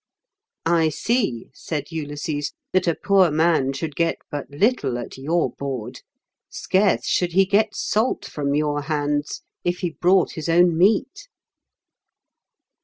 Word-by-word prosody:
"I 165 -1 +3
see," 200 - -1
said 150 +1 -5
Ulysses, 145 -1 -4 0.2
"that 185 -1 +2
a 170 - +2
poor 195 -3 +3
man 155 -3 +2
should 145 +2 -5
get 165 -1 +1 0.2
but 145 -2 -5
little 145 - +1
at 120 - -7
your 160 +6 0
board; 135 -5 -6 0.5
scarce 195 +2 +1
should 175 -1 0
he 195 +2 +5
get 205 +2 +1
salt 220 +4 0
from 140 -1 -2
your 150 -1 0
hands, 145 0 -2 0.2
if 175 0 -1
he 175 -2 -1
brought 180 +3 +2
his 160 0 -5
own 175 0 +4
meat." 225 - +1
165 Hz, 135 wpm, -22 LUFS, 145-185 Hz, 0.5 s, he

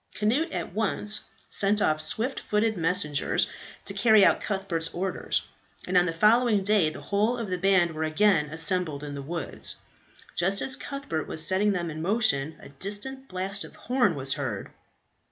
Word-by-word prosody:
Cnut 235 +10 +1
at 175 -1 -4
once 210 0 0 0.3
sent 205 +1 +2
off 155 -6 +2
swift 245 - -1
footed 215 +1 0
messengers 165 -4 +1 0.4
to - - -2
carry 220 -4 +5
out - - +3
Cuthbert's 190 -5 -2
orders, 190 +2 -1 0.4
and 185 - -3
on 180 0 +5
the - - 0
following 210 +4 +3
day 200 -5 +3
the - - -9
whole 215 +5 +1
of 225 -5 -5
the 180 - 0
band 185 -2 +4
were 155 0 -6
again 160 0 +3
assembled 160 -1 -1
in 145 -1 -6
the 140 - -5
woods. 165 +2 -4 0.6
Just 195 +3 +2
as 265 - 0
Cuthbert 275 - -5
was 160 0 +3
setting 195 +3 +2
them 170 -3 -2
in 155 +1 -6
motion, 165 -7 +1
a - - -12
distant 205 - -4
blast 190 +2 -2
of - - -12
a - - -19
horn 245 -8 +1
was 135 -1 -2
heard. 120 -9 -4
190 Hz, 175 wpm, -27 LUFS, 160-210 Hz, 0.6 s, carry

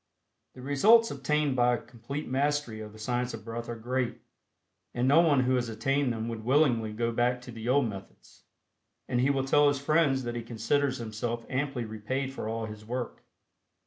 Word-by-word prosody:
The 125 - -10
results 215 - +5
obtained 150 -3 0
by 125 -1 +3
a - - -3
complete 130 +5 -7
mastery 140 -3 0
of 105 0 -8
the 110 - -14
Science 120 +2 -2
of 110 - -12
Breath 115 +1 -5
are 120 - -3
great, 125 +2 -2 0.8
and 120 +1 +1
no 145 +5 +6
one 145 -6 +4
who 130 0 +1
has 120 -2 -1
attained 135 +4 0
them 115 0 -3
would 115 -1 -5
willingly 125 -4 +2
go 115 +2 -1
back 120 +2 +1
to 125 - -10
the 115 +1 -5
old 135 -1 +3
methods, 100 -3 -11 0.6
and 120 - +1
he 130 - +3
will 135 -1 +1
tell 145 +2 +4
his 145 0 +2
friends 140 -2 +2
that 120 -1 -3
he 120 - -3
considers 125 +4 0
himself 115 +1 -4
amply 135 -2 -1
repaid 130 +5 -3
for 110 - -4
all 115 0 -2
his 105 -1 -9
work. 120 +2 -5
125 Hz, 195 wpm, -29 LUFS, 115-140 Hz, 0.8 s, no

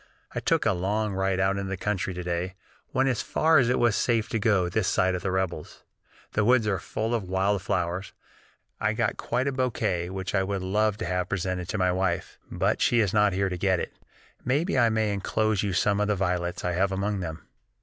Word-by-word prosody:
I - - -2
took - - +1
a - - +3
long 105 +3 -1
ride 95 0 0
out 95 +1 +2
into 100 -1 -3
the 95 - -3
country 95 -1 -2
to 90 - -4
day; 90 +2 -2 0.4
went 135 +1 +2
as 125 -4 +1
far 160 -1 +3
as 120 -2 +2
it 125 - +2
was 120 -3 +3
safe 115 -3 +1
to 115 - -1
go 100 -4 +2
this 95 +3 0
side 95 0 +2
of 90 - -2
the 95 - -2
rebels. 95 -4 -3 0.5
The 105 - +1
woods 120 0 +4
are 100 -3 0
full 110 +2 -3
of 105 -6 -2
wild 95 +1 +1
flowers; 90 0 -2 0.7
I - - +1
got - - 0
quite 130 +2 -1
a - - +1
bouquet 115 -9 -1
which 95 0 -4
I 95 - +3
would 95 0 -2
love 105 +2 +1
to 115 - -4
have 90 +1 -1
presented 90 -1 -2
to - - -1
my 90 -2 +2
wife, 90 -1 -2
but - - 0
she 120 - +3
was 105 -5 +2
not 105 -2 +4
here 95 +1 +1
to 90 - -3
get 95 -2 +2
it; - - -4 0.5
maybe 145 +9 +1
I 120 -3 +4
may 110 -2 +1
enclose 105 +1 0
you 100 - -1
some 100 +3 +2
of 105 - +1
the 105 - +1
violets 90 -2 -1
I 90 - +1
have 95 +3 +1
among 100 +1 -1
them." 80 -3 -6
95 Hz, 230 wpm, -26 LUFS, 90-110 Hz, 0.7 s, woods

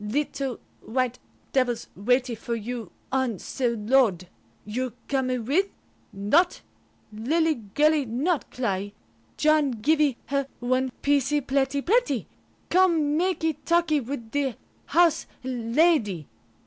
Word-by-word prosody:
Little 270 +2 -2 0.2
white 250 +1 -1 0.3
devils 250 -3 +1
waitee 245 +4 +1
for 235 +1 -4
you 230 -2 -5 0.2
on 260 -5 0
ce - - -8
load. 225 -5 +2 0.4
You 245 +3 -3
comee 260 -2 0
with? 285 - +1 0.4
Not? 255 - +2 0.5
Lillee 275 0 0
girlee 300 -2 +3
not 280 +8 -1
cly. 205 -5 -2 0.4
John 305 -2 +4
givee 275 +3 +2
her 275 -1 -1
one 255 +1 0
piecee 285 +1 +2
pletty 275 +1 0
pletty. 485 +6 +2 0.5
Come 335 -5 +3
makee 325 -3 0
talkee 335 -3 +2
with 235 -3 -6
the 275 -4 0 0.3
House 335 0 +3 0.2
Lady." 240 - +1
265 Hz, 110 wpm, -26 LUFS, 235-305 Hz, 0.5 s, John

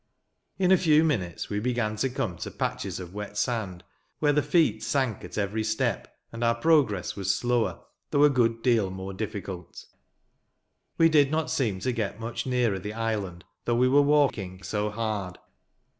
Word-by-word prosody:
In 185 -1 +2
a 190 - +7
few 155 -2 +4
minutes 95 - -1
we 105 - 0
began 120 -2 -1
to 135 +5 0
come 115 -7 -3
to - - -5
patches - - -3
of 90 -1 -8
wet 105 0 -6
sand, 105 -6 -2 0.3
where 145 -1 +2
the 150 - +3
feet 165 +1 +2
sank 130 -7 -1
at - - -8
every 105 +2 -1
step, 110 0 -2
and 115 +1 -5
our 115 0 +3
progress 120 - +2
was 95 -1 0
slower, 120 -2 0 0.3
though 145 - +3
a 150 - +7
good 115 -3 +1
deal 115 -6 +3
more 95 +1 -6
difficult. 95 -4 -6 1.1
We 165 - +6
did 150 -4 +4
not 155 +1 -1
seem 105 -9 0
to 130 - 0
get 110 -3 -3
much 115 +3 -4
nearer 120 -6 +1
the 105 +3 -6
island, 105 -6 -3 0.2
though 120 - +1
we 125 +2 +4
were 140 +3 +5
walking 130 -11 +1
so 105 +1 -1
hard. 105 -4 -3
115 Hz, 175 wpm, -27 LUFS, 100-130 Hz, 1.1 s, a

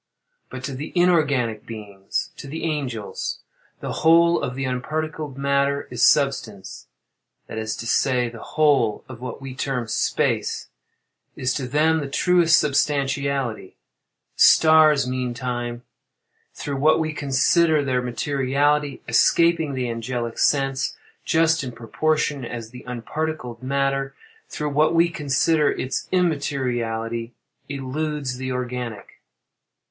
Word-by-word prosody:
But 130 0 -8
to 140 - -4
the 140 +4 -6
inorganic 140 -11 +2
beings—to 105 +3 -6
the 160 +4 -6
angels—the 135 -10 -5
whole 170 +1 +4
of 125 -2 -3
the 135 +1 -2
unparticled 155 +2 -3
matter 140 0 +1
is - - -4
substance—that 115 -6 -2
is 110 -1 -3
to - - -7
say, 125 +1 +2
the 115 -1 -9
whole 140 -8 +1
of 125 -2 -10
what 125 0 -6
we 135 -1 -6
term 130 -2 -2
"space" - - -1 0.7
is 130 0 -1
to 130 -3 -3
them 155 +4 +2
the 140 -2 -4
truest 175 +2 +4
substantiality;—the 140 -6 0 0.7
stars, 155 -4 +6
meantime, 125 -1 -3 0.7
through 140 -1 -4
what 155 +4 +4
we 155 -1 -1
consider 150 +2 +2
their 130 -2 +1
materiality, 140 +3 0
escaping 165 -4 +3
the 125 -1 -1
angelic 115 0 -4
sense, 135 -1 +1 0.3
just 160 -1 +3
in 130 - -5
proportion 145 +5 -1
as 115 -2 -6
the 125 +1 -11
unparticled 125 0 -4
matter, 135 +1 -1 0.3
through 150 -1 -3
what 155 +3 +3
we 170 +1 +4
consider 150 0 +2
its 130 +1 -3
immateriality, 120 -9 -1 0.3
eludes 140 -1 -3
the 130 0 -4
organic. 125 -4 -5
135 Hz, 115 wpm, -23 LUFS, 125-150 Hz, 0.7 s, stars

